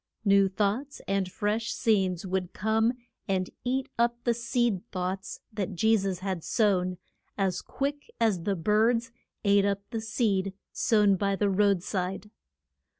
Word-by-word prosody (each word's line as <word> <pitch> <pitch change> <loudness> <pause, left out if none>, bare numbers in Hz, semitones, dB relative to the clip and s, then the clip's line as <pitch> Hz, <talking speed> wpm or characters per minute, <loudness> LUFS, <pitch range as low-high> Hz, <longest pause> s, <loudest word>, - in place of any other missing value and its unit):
New 195 -1 +5
thoughts 215 +9 -1
and 195 -2 0
fresh 215 +3 -1
scenes 195 -7 +1
would 185 -1 -2
come 220 +3 +2 0.3
and 185 -2 0
eat 260 +1 0
up 235 0 +2
the 240 - +2
seed 235 -4 0
thoughts 185 +1 -4
that 205 -4 -3
Je 220 +6 +4
sus 195 -3 -1
had 190 -4 -3
sown, 185 -5 +1 0.4
as 190 -3 0
quick 285 +6 -4
as 215 -6 +2
the 195 +3 0
birds 225 +7 +2 0.3
ate 200 0 +5
up 200 0 -1
the 225 - -2
seed 205 -4 0 0.2
sown 210 -4 +3
by 200 +1 +1
the 200 0 +1
road 200 -2 +3
side. 190 +2 -3
200 Hz, 150 wpm, -28 LUFS, 190-225 Hz, 0.4 s, New